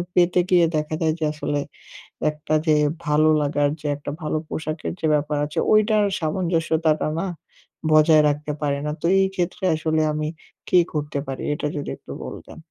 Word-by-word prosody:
পেতে 180 0 +4
গিয়ে 175 -2 +5
দেখা 155 +1 -2
যায় 160 -1 +2
যে, - - -2
আসলে 145 -1 -2 0.7
একটা 150 +1 -5
যে 155 - +5 0.3
ভালো 155 +1 +4
লাগার 145 0 +1
যে 150 - -4
একটা 145 0 -6
ভালো 155 0 -1
পোশাকের 155 +1 -4
যে - - -1
ব্যাপার 150 0 -1
আছে, 150 - -3
ঐটার 215 -1 +4
সামঞ্জস্যতাটা 160 -2 0
না 195 - -2 0.6
বজায় 155 0 +6
রাখতে 150 +1 -2
পারি 140 -1 0
না। 150 - -1
তো - - -3 0.2
এই 190 - +3
ক্ষেত্রে 180 +1 -2
আসলে 155 0 0
আমি 150 0 -2 0.4
কি 180 - +6
করতে 150 -1 -2
পারি 135 -1 -5
এটা 150 - -2
যদি 145 - -4
একটু - - -12
বলতেন? - - -9
155 Hz, 170 wpm, -23 LUFS, 150-165 Hz, 0.7 s, বজায়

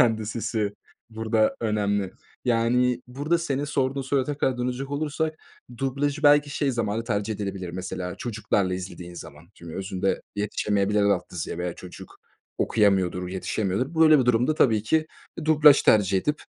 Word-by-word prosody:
Kendi 110 -3 +2
sesi, 110 -2 -2 0.4
burada 110 0 +1
önemli. 105 -3 0 0.3
Yani, 125 +1 +2
burada 145 +7 -1
senin 145 -4 -2
sorduğun 135 -2 -1
soruya 135 0 0
kadar 130 -3 0
dönecek 125 +3 -3
olursak, 155 +2 -2 0.4
dublajı 140 +2 -1
belki 145 0 +5
şey 140 -1 0
zamanı 115 -2 -2
tercih 105 -2 -1
edilebilir, 95 -3 -5
mesela, 90 0 -5
çocuklarla 105 -5 -1
izlediğin 90 -1 -7
zaman 75 +1 -11
çünkü 85 -1 -10
özünde 95 0 -2
yetişemeyebilir 105 0 0
alt 100 -3 +1
yazıya 85 -1 -4
veya 90 -1 -3
çocuk 90 -1 -12 0.4
okuyamıyordur, 95 -4 +2
yetişemiyordur. 100 - -2
Böyle 155 -2 +6
bir 130 - +2
durumda 125 +5 +2
tabii 110 -8 +3
ki 155 +8 +1 0.4
dublaj 150 -2 +6
tercih 100 -3 +4
edip 150 +8 -2
110 Hz, 140 wpm, -25 LUFS, 100-135 Hz, 0.4 s, Böyle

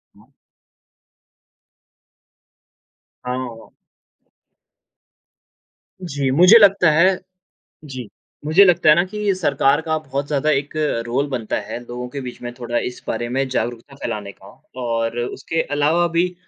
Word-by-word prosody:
हुँ। - - -23 2.9
हाँ। 125 -3 -5 2.3
जी, 140 -5 -2
मुझे 180 +10 +7
लगता 195 -5 +5
है 175 +5 +4 0.7
जी, 130 -6 -8 0.4
मुझे 160 +7 +6
लगता 175 -4 +3
है 150 - +9
ना 175 - +3
कि 205 +1 -1
सरकार 145 -6 +2
का 160 -1 -1
बहुत 140 -2 -4
ज़्यादा 150 +1 0
एक 140 0 0 0.4
रोल 130 +4 0
बनता 120 -5 -3
है, - - -6
लोगों 125 +1 -6
के 140 +3 -6
बीच 125 -2 -8
में 120 0 -5
थोड़ा 120 -1 -3
इस 125 - -7
बारे 120 +1 -2
में 135 +3 -1
जागरूकता 120 +1 -4
फैलाने 105 -6 -5
का 95 - -19 0.4
और 115 0 -2
उसके 140 +6 -2
अलावा 150 +5 +1
भी 180 +1 +1
140 Hz, 125 wpm, -20 LUFS, 120-165 Hz, 2.9 s, है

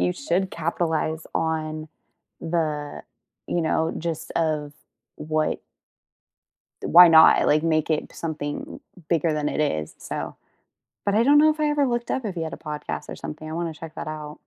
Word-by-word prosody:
you 90 0 +2
should 180 +6 -1
capitalize 160 -1 -1
on 155 -1 -2 0.5
the, 155 -3 -2 0.4
you 175 - 0
know, 160 0 +1
gist 165 -1 -4
of 150 -3 -1 0.4
what 155 0 -1 1.2
th - - -4
why 175 +1 +10
not? 160 -1 +7
Like, 150 +1 +3
make 160 -1 +1
it 155 - -1
something 150 -3 -5 0.3
bigger 165 -1 +2
than 150 -1 -1
it - - -2
is, 80 - -1
so - - -5 0.7
but 200 - +1
I 215 - +4
don't 290 +3 +6
know 310 +1 +6
if 310 - -7
I 305 - +2
ever 295 -1 +2
looked 240 -2 -2
up 260 - -1
if 200 - -3
he 170 - -4
had 160 -1 -3
a - - -6
podcast 150 -1 -6
or - - -5
something. 155 +1 -7
I 155 - -6
wanna 170 -1 -3
check 160 +1 -9
that - - -6
out. 155 -1 -6
160 Hz, 180 wpm, -24 LUFS, 155-170 Hz, 1.2 s, why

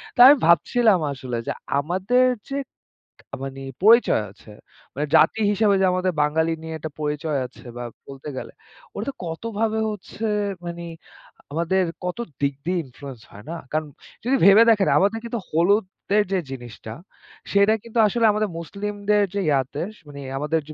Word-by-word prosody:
তো - - -10
আমি 285 - +9
ভাবছিলাম 200 +4 +4
আসলে 130 -3 -5
যে - - 0 0.3
আমাদের 190 - +2 0.2
যে 275 - -2 0.9
মানে 135 0 -6 0.2
পরিচয় 225 - +5
আছে, 105 +2 -16 0.4
মানি 145 +3 -2
জাতি 160 +7 +4
হিসেবে 205 0 +3
যে - - +4
আমাদের 185 0 +1
বাঙালি 160 +2 +1
নিয়ে 160 0 -6
একটা 155 0 -6
পরিচয় 150 0 -1
আছে 125 - -18
বা 120 - -5 0.2
বলতে 135 +2 -8
গেলে, - - -6 0.4
ওটাতে 275 - -3
কতভাবে 220 +6 -2
হচ্ছে 210 +2 -7 0.4
মানে, 170 0 -6 0.7
আমাদের 170 +5 +1 0.2
কত 180 - -3 0.2
দিক 140 0 +1
দিয়ে 180 +1 0
ইনফ্লুয়েন্স 130 -2 -11
হয়, 105 +2 -13
না? 170 - -4 0.2
কারণ 155 0 0 0.4
যদি 255 +4 +2
ভেবে 200 +3 +8
দেখেন, 210 -4 +4
আমাদের 205 +4 +1
কিন্তু 235 0 -3
হলুদের 195 +4 +2
যে 190 - +2
জিনিসটা, 120 -4 -8 0.6
সেটা 200 +2 +4
কিন্তু 230 0 -3
আসলে 230 +3 +1
আমাদের 210 0 0
মুসলিমদের 205 +3 -1
যে - - +1
ইয়াতে 140 0 0 0.2
মানে, 140 -1 -9 0.2
আমাদের 150 +3 0
180 Hz, 150 wpm, -23 LUFS, 150-210 Hz, 0.9 s, আমি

